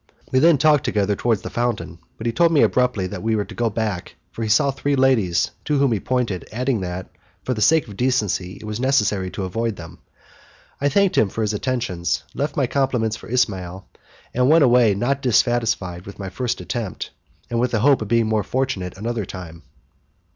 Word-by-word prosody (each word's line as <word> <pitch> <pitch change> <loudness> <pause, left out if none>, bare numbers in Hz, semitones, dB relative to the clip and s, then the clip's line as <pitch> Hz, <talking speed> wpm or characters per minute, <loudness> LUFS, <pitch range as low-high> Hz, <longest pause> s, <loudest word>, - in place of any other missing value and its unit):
We 130 - +3
then 165 +1 +5
walked 150 -3 +5
together 105 -1 0
towards 115 -1 0
the - - -6
fountain, 120 -7 -2 0.2
but 110 - -8
he 115 - 0
told 170 +3 +3
me 155 - +4
abruptly 125 -6 +2
that 95 -1 -5
we 110 0 0
were 105 -1 -1
to - - -11
go 120 -1 0
back, 105 -4 -3 0.2
as 115 - -3
he 110 - -2
saw 125 +6 +4
three 140 +1 -1
ladies 115 -11 +2
to 150 -2 +1
whom 140 -2 +3
he 110 - +1
pointed, 115 -6 -2
adding 125 0 -1
that, 90 0 -5 0.4
for 130 - -1
the 110 - -4
sake 155 +5 +4
of 105 - -10
decency, 105 -8 0
it - - -13
was 105 +1 -5
necessary 105 -8 +1
to 95 - -5
avoid 115 +4 -2
them. 85 -2 -11 0.8
I 145 - +3
thanked 195 +4 +3
him 105 - +3
for 110 - -3
his 105 0 0
attentions, 100 - -2
left 145 +2 -3
my 140 - +3
compliments 120 -4 0
for - - -12
Ismail, 95 -6 -1 0.5
and 125 +2 +2
went 160 0 +6
away 120 -5 +5
not 135 +7 0
dissatisfied 115 -8 +1
with 100 - -9
my 95 -2 -5
first 125 +4 -3
attempt, 115 -6 -4 0.4
and 115 - 0
with 125 +1 +2
the 110 -3 0
hope 140 0 +4
of 110 - -3
being 115 +1 +2
more 110 -1 +1
fortunate 100 -8 -2
another 115 0 -3
time. 85 -3 -9
115 Hz, 205 wpm, -21 LUFS, 100-130 Hz, 0.8 s, went